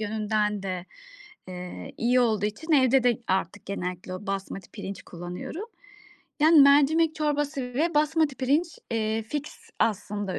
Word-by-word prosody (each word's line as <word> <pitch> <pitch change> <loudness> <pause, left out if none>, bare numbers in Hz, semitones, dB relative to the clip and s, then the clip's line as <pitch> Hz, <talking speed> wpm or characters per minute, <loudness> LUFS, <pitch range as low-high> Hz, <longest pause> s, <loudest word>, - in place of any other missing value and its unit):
yönünden 210 -1 -1
de, 185 -2 -4 0.6
eee, 180 - -8
iyi 250 +2 +3
olduğu 215 -4 +2
için 315 +11 -4
evde 265 -2 +5
de 240 -3 +3
artık 190 +1 -1
genellikle 180 -1 -4
o 190 +2 -8
basmati 195 -1 -5
pirinç 195 0 -7
kullanıyorum. 180 - -7 0.8
Yani, 310 0 +7
mercimek 295 +3 +5
çorbası 290 -4 -1
ve 330 +6 +1
basmati 305 -1 +2
pirinç, 295 +6 0
eee, 220 -1 0
fiks 290 +6 -7
aslında 205 -2 -1
225 Hz, 135 wpm, -26 LUFS, 195-295 Hz, 0.8 s, Yani